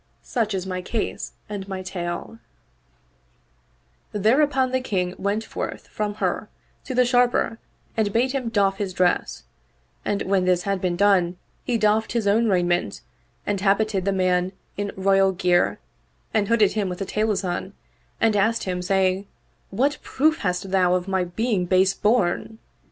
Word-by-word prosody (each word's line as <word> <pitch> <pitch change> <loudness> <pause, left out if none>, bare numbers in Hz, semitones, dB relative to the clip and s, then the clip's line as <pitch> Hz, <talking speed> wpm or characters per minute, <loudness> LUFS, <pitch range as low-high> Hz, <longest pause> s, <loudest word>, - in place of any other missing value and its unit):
Such 220 -5 -1
is 185 -1 -3
my 185 -1 -3
case 220 +4 -3
and 200 -2 -6
my 190 -1 -5
tale/' 180 +4 -5 1.7
There 220 +8 +3
upon 265 -3 +2
the 260 0 +1
King 180 -7 -1
went 205 +2 -1
forth - - -6
from 210 -1 -3
her - - -2 0.4
to 260 - -4
the 250 0 +4
Sharper 245 -2 +2 0.4
and 215 -2 +1
bade 245 +5 +2
him 260 -4 -2
doff 195 -3 +2
his 195 -2 -3
dress, 180 -1 +1 0.6
and 200 - -1
when 190 -1 +1
this 180 -1 +2
had 195 -2 -1
been 180 -2 0
done 180 -2 +3 0.3
he 240 - 0
doffed 215 0 +2
his 230 -3 0
own 220 +3 +3
raiment 175 -2 +1 0.4
and 200 -2 -1
habited 200 -1 +1
the 200 - +2
man 185 -1 +1 0.2
in 205 0 -3
royal 195 0 +3
gear 180 -1 +2 0.6
and 210 -2 +2
hooded 215 -3 +4
him 205 -3 -1
with 180 - -4
the 195 - -3
Taylasan 195 -2 -1 0.5
and 225 -2 +3
asked 225 +3 +2
him 180 -1 -2
saying, 190 +1 +1 0.4
"What 275 +9 0
proof 315 +4 +1
hast 185 0 -2
thou 180 -2 +3
of 180 +1 -2
my 190 -2 0
being 195 0 -1
base 190 +1 +4
born?" 215 0 +1
200 Hz, 160 wpm, -23 LUFS, 185-220 Hz, 1.7 s, the